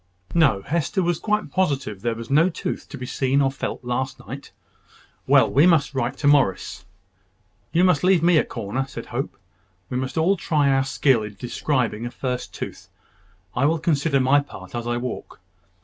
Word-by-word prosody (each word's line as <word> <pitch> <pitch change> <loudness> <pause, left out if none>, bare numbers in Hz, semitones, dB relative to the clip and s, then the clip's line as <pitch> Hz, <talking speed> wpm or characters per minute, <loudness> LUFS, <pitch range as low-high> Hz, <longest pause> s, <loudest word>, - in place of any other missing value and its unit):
No: 135 -13 +3
Hester 170 +5 -1
was 175 -1 0
quite 210 0 -1
positive 140 - -1
there 115 +1 -1
was 115 +3 -8
no 160 +6 +5
tooth 165 - -5
to - - -7
be 125 - -6
seen 135 +2 +1
or 135 -1 +2
felt 135 - -5
last 125 +2 -2
night. - - -9 0.8
"Well, - - +6
we 145 +6 +4
must 160 -5 +3
write 130 0 -2
to 145 - 0
Morris." 135 -11 +2 0.9
"You 175 - +3
must 180 -5 +3
leave 185 -3 +4
me 170 -2 +5
a - - +2
corner," 130 +7 -4
said 115 - -8
Hope. 125 +3 -4 0.5
"We 125 - -1
must 130 +3 -3
all 180 +5 +3
try 150 -4 +1
our 135 0 +2
skill 130 -3 +2
in 105 -1 -7
describing 120 0 -1
a - - -4
first 125 0 -4
tooth. - - -7 0.7
I 130 - +2
will 165 +2 +2
consider 150 -3 +1
my 135 +2 +4
part 95 -10 -9
as 120 0 -4
I 120 0 0
walk. 125 -4 -6
135 Hz, 185 wpm, -23 LUFS, 120-160 Hz, 0.9 s, Well